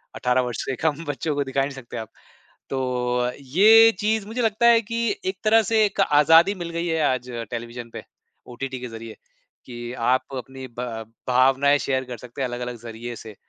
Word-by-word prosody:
18 125 +1 +1
वर्ष 125 -1 -4
से 135 - -2
कम 160 0 0
बच्चों 145 +1 -2
को 145 - 0
दिखा 135 0 -1
ही 135 - +2
नहीं 140 - -9
सकते 130 -3 -9
आप। 110 -1 -6 0.6
तो 125 -2 -1
अ, 125 0 0
ये 215 - +6
चीज़ 215 0 0
मुझे 235 +3 -3
लगता 225 +1 +1
है 230 -1 +6
कि 230 +2 -2 0.2
एक 380 - -2
तरह 225 +1 +5
से 220 +1 +2
एक 200 - -4
आज़ादी 165 +4 +5
मिल 175 -3 -6
गई 170 +1 -3
है 160 -1 0
आज 125 -1 -4 0.2
टेलिविज़न 120 0 -6
पे - - -7 0.5
ओटीटी 130 0 -5
के 125 - -6
ज़रिए, 115 -1 -9 0.5
कि 120 -1 -7
आप 125 +1 +1
अपनी 130 +1 -8
ब - - -2 0.4
भावनाएँ 135 +3 +4
शेयर 130 -1 -1
कर 125 -1 -7
सकते 125 +4 -9
हैं 130 - +1
अलग-अलग 120 0 -5
ज़रिए 120 +1 -7
से। 110 -2 -11
130 Hz, 200 wpm, -23 LUFS, 125-170 Hz, 0.6 s, ये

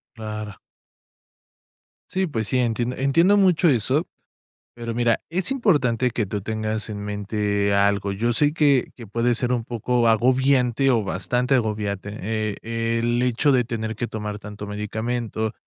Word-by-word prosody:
Claro. 110 -2 -6 1.6
Sí, 190 0 0
pues 110 -8 -2
sí, 130 - +1
entien 120 +1 0
entiendo 165 +10 +4
mucho 180 -3 +4
eso, 130 +5 +1 0.7
pero 115 -1 -5
mira, 120 -1 +2
es 185 +7 -1
importante 140 - +2
que 110 -2 -1
tú 100 +1 -4
tengas 110 +1 -3
en 105 -1 -5
mente 100 0 -1
algo, 100 0 +2
yo 115 +5 0
sé 145 +4 +2
que, 145 -5 +2
que 115 -3 -11
puede 115 +4 +1
ser 120 +1 0
un 120 -2 0
poco 120 +1 0
agobiante, 130 +2 +3
o 115 -3 +2
bastante 125 +8 0
agobiante, 105 -4 -2
eh, 110 0 -2 0.4
el 120 +1 +1
hecho 125 +4 +2
de 125 -2 +3
tener 110 -1 -4
que 120 - -3
tomar 105 -2 -5
tanto 105 0 -8
medicamento, 110 +2 -3
115 Hz, 150 wpm, -23 LUFS, 105-125 Hz, 1.6 s, entiendo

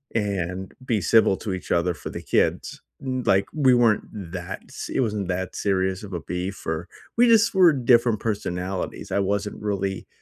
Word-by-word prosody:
and 95 -3 -2
be 110 -5 +1
civil 110 -1 +4
to 100 - -4
each 95 - -6
other 85 +1 +2
for - - -7
the - - -6
kids." - - 0 0.2
Mm 130 -2 -2
like, 95 +1 +4
we 135 -5 +4
weren't 120 -3 +3 0.3
that 90 +1 -6
s - - -7
it - - +1
wasn't 105 -5 -1
that 95 0 -3
serious 95 -1 0
of 100 -2 -8
a 85 - -3
beef 90 +4 -5
or 80 +2 -2 0.3
we 245 +1 +6
just 225 -1 +5
were 180 -4 +6
different 120 -4 +3
personalities. 95 -3 -3
I - - +1
wasn't 100 +1 -1
really 100 -2 -2
100 Hz, 180 wpm, -24 LUFS, 95-115 Hz, 0.3 s, we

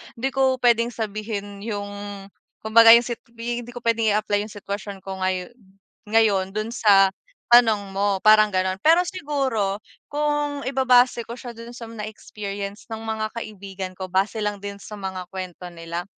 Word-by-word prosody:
hindi 260 +3 -2
ko 265 0 +2
pwedeng 235 -1 +4
sabihin 210 -3 -5
yung 205 -2 -4 0.7
kumbaga 225 +1 +8
yung 235 - +4
sit 240 -1 -5 0.2
hindi 240 +1 -5
ko 245 - -8
pwedeng 230 -1 +2
i-apply 210 -1 +1
yung 215 - -13
sitwasyon 200 -1 -6
ko 190 -1 -6
ngayo 185 +1 -2 0.5
ngayon 210 -3 +2
dun 215 +1 -2
sa 200 -5 +5 0.4
tanong 225 -4 +5
mo 195 0 0
parang 215 -1 +6
ganon. 185 0 0
Pero 330 +3 +6
siguro 265 - -1 0.2
kung 295 -1 -1
ibabase 255 -3 +3
ko 235 - -7
siya 245 0 -8
dun 230 +1 -9
sa 235 -2 -9
mga 220 -2 -6
experience 205 -1 -7
ng 220 - -6
mga 220 -1 -3
kaibigan 195 -4 -7
ko, 190 - -4
base 190 +4 0
lang 210 -2 -2
din 200 0 -6
sa 205 +2 -11
mga 190 -3 -5
kwento 185 -1 -6
nila, 170 +1 -5
215 Hz, 165 wpm, -23 LUFS, 200-235 Hz, 0.7 s, kumbaga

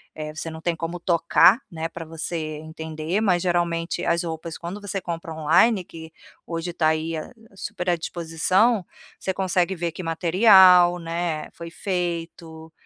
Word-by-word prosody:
eh, 155 -1 -5
você 160 +1 -6
não 160 0 -9
tem 175 0 -1
como 170 +2 -5
tocar, 170 +4 +4
né, 165 0 -4
para 165 -1 -8
você 160 -1 -5
entender, 160 +3 -4
mas 185 -5 +2
geralmente 170 -1 -1
as 170 +1 +1
roupas, 160 0 -5
quando 180 +4 -6
você 200 -1 -4
compra 165 -1 -5
online, 175 +7 +3
que 160 -1 -11 0.3
hoje 170 +1 -4
tá 160 -2 +1
aí 160 +1 -1
a 155 - -6 0.2
a 195 - -21
super 180 -1 -4
à 175 - +3
disposição, 175 +6 +1 0.3
você 190 - -2
consegue 185 0 0
ver 170 -1 -2
que 180 +3 -8
material, 180 +1 +6
né, 165 -1 -3
foi 170 0 -9
feito, 170 -3 -4
170 Hz, 165 wpm, -23 LUFS, 160-180 Hz, 0.3 s, material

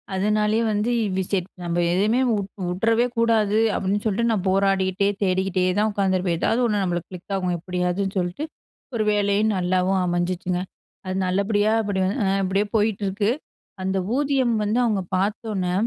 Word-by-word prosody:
அதனாலேயே 210 +3 +1
வந்து 210 +2 0 0.3
வி 190 - +1
செ 200 - +3 0.3
நம்ம 170 0 -2 0.2
எதுவுமே 210 +7 +2
வு - - +2 0.3
வுட்டுறவே 225 +7 +2
கூடாது. 220 -2 +2 0.2
அப்படின்னு 195 +2 0
சொல்லிட்டு 225 +2 +1
நான் 205 -4 -1
போராடிக்கிட்டே 195 0 +2 0.2
தேடிக்கிட்டே 190 0 +1 0.2
தான் 215 +1 +2
உட்காந்துருப்பேன் 185 -3 0
எதாவது 230 - +1
ஒண்ணு 210 -3 +1
நம்மளுக்கு 175 -2 -2
கிளிக் 185 +2 -7
ஆகும். 180 -2 -1
எப்படியாவதுன்னு 180 +3 -2
சொல்லிட்டு, 180 - -3 0.5
ஒரு 220 - +1
வேலையும் 205 +1 +2
நல்லாவும் 185 +1 +1
அமைஞ்சிச்சிங்க! 180 0 -1 0.4
அது 185 0 -3
நல்லபடியா 205 +3 +1
அப்படி 200 -3 -2 0.4
அப்படியே 195 +2 +1
போயிட்டு 210 -1 +1
இருக்கு. 200 +3 0 0.5
அந்த 190 +1 0 0.2
ஊதியம் 270 -4 +1
வந்து 210 +3 0
அவங்க 210 -4 +1 0.2
பார்த்த 210 +4 -1
உடனே, 180 -2 -1
195 Hz, 145 wpm, -23 LUFS, 185-215 Hz, 0.5 s, செ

